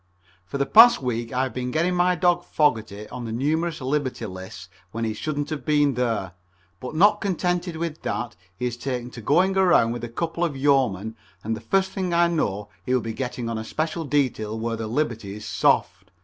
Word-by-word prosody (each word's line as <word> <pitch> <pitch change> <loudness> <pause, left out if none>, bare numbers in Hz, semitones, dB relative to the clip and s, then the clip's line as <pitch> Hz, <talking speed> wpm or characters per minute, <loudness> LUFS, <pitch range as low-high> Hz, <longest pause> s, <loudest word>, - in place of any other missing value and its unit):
For 140 - -4
the 140 - +1
past 235 - +8
week 120 -2 -2
I 130 +1 +1
have 130 -3 -3
been 125 +1 -3
getting 170 +7 +1
my 180 0 +3
dog 175 0 +2
Fogerty 110 -8 0
on 125 -1 -6
numerous 155 +4 -1
liberty 135 0 -2
lists 95 0 -8 0.2
when 115 +2 -4
he 110 - -1
shouldn't 145 +5 -3
have 155 - -4
been 145 -2 +3
there, 115 -6 -1 0.5
but 125 +7 -7
not 205 +5 +5
contented 180 -2 -1
with 165 -1 -4
that 120 -1 -3 0.2
he 125 - -3
has 120 -1 -2
taken 125 -1 -4
to 120 - -9
going 180 - +3
around 180 -12 +4
with 120 0 -5
a 120 - -4
couple 165 +7 -2
of 155 -6 -1
yeomen, 125 -7 +1 0.3
and 110 +1 -1
the 110 - -9
first 190 +5 +1
thing 185 -3 -2
I 170 0 +5
know 105 - -1
he 130 - +1
will 125 - +2
be 115 0 -4
getting 125 -1 -4
on 115 -1 -2
a - - -4
special 160 +7 -2
detail 125 -7 -1
where 115 0 -2
the 110 -1 -4
liberty 115 -5 -2
is 105 +1 -9
soft. 90 -1 +1
130 Hz, 205 wpm, -24 LUFS, 115-165 Hz, 0.5 s, past